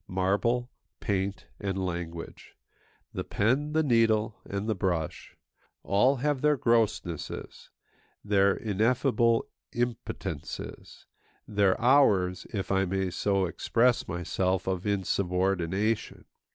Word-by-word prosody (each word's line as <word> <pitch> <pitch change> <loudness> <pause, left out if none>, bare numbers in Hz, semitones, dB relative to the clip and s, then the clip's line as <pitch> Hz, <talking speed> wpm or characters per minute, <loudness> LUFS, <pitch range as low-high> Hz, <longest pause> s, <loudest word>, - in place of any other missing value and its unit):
Marble, 105 +7 0 0.3
paint, 100 -1 -2
and 95 -2 -2
language, 85 -2 -6 0.6
the - - -3
pen, 135 +8 0
the 160 0 +3
needle, 115 -4 +2
and 100 +2 -4
the 110 - +2
brush, 90 -5 -3 0.5
all 105 +8 +3
have 140 +1 -1
their 150 -1 +3
grossnesses, 110 - -1 0.6
their 100 -1 +3
ineffable 115 +2 +2 0.3
impotences, 120 -1 -5 0.4
their 100 -2 +2
hours, 105 -8 +3
if 100 -2 -3
I 95 0 +3
may 95 0 -1
so 100 +1 +1
express 120 +7 +1
myself, 90 +1 -1
of 95 +1 -2
insubordination. 95 +1 0
100 Hz, 100 wpm, -28 LUFS, 95-115 Hz, 0.6 s, the